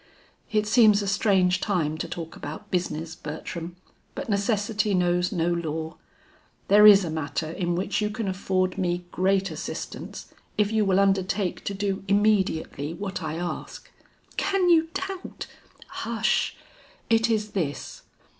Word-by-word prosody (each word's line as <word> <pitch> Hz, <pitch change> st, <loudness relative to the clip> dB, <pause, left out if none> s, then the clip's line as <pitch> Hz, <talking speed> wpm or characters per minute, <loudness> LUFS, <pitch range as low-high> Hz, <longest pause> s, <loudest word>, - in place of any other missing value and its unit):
"It 215 Hz, -1 st, +2 dB
seems 215 Hz, -2 st, +5 dB
a -, -, -3 dB
strange 190 Hz, -2 st, +2 dB
time 165 Hz, -7 st, 0 dB
to -, -, -3 dB
talk 165 Hz, -1 st, -6 dB
about 150 Hz, +2 st, -8 dB
business, 165 Hz, -2 st, -2 dB
Bertram, 165 Hz, +2 st, -6 dB, 0.4 s
but 275 Hz, -2 st, -5 dB
necessity 205 Hz, 0 st, +1 dB
knows 180 Hz, 0 st, +2 dB
no 170 Hz, -3 st, 0 dB
law. 160 Hz, -1 st, -3 dB, 0.7 s
There 210 Hz, +1 st, +8 dB
is 200 Hz, -2 st, +8 dB
a 160 Hz, -, -3 dB
matter 155 Hz, 0 st, -3 dB
in 175 Hz, 0 st, -1 dB
which 190 Hz, +4 st, -1 dB
you 210 Hz, -, +1 dB
can 215 Hz, 0 st, -4 dB
afford 185 Hz, 0 st, 0 dB
me 175 Hz, -1 st, -1 dB
great 195 Hz, 0 st, +1 dB
assistance 155 Hz, -, -7 dB, 0.2 s
if 210 Hz, 0 st, +2 dB
you 220 Hz, -1 st, +2 dB
will 190 Hz, 0 st, +3 dB
undertake 195 Hz, -1 st, +1 dB
to 200 Hz, -, -2 dB
do 195 Hz, -1 st, -2 dB
immediately 190 Hz, -7 st, +1 dB
what 190 Hz, -1 st, -4 dB
I 160 Hz, -1 st, -3 dB
ask." 175 Hz, +1 st, -6 dB, 0.5 s
"Can 390 Hz, -2 st, +2 dB
you 325 Hz, -1 st, +5 dB
doubt 380 Hz, -1 st, -5 dB, 0.3 s
" -, -, -18 dB
"Hush, -, -, 0 dB, 0.5 s
it 225 Hz, +1 st, +3 dB
is 215 Hz, -2 st, 0 dB
this. 150 Hz, -8 st, -3 dB
190 Hz, 145 wpm, -26 LUFS, 170-210 Hz, 0.7 s, There